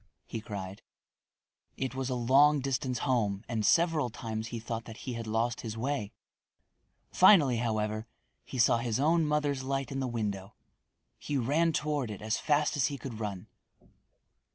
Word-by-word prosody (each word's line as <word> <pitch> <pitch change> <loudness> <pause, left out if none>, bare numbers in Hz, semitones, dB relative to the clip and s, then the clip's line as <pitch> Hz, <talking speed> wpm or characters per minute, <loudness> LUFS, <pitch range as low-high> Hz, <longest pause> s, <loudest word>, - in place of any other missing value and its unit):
he 115 - -5
cried. 100 -2 -7 1.0
It 130 -1 -2
was 130 0 -3
a 130 - -1
long 140 +5 +5
distance 130 -1 -1
home 110 -6 0
and 115 -3 -2
several 160 +2 +3
times 110 -1 -5
he 115 0 -5
thought 115 0 -5
that 115 -1 -10
he 130 - -3
had 115 -1 -5
lost 115 +2 0
his 115 -1 -5
way. 115 -4 -2 1.0
Finally, 160 - +6
however, 110 -1 -1 0.4
he 130 - -7
saw 115 -1 +4
his 120 -1 -1
own 160 +2 +3
mother's 150 -2 0
light 135 0 -2
in 135 - -3
the 130 - -1
window. 105 -5 -4 0.6
He 145 - -2
ran 150 +7 +2
toward 150 -5 -1
it 105 - -6
as 110 +1 0
fast 150 0 +1
as 140 -4 +2
he 140 -1 -4
could 120 -3 -7
run. 100 -4 -4
120 Hz, 165 wpm, -30 LUFS, 110-140 Hz, 1.0 s, Finally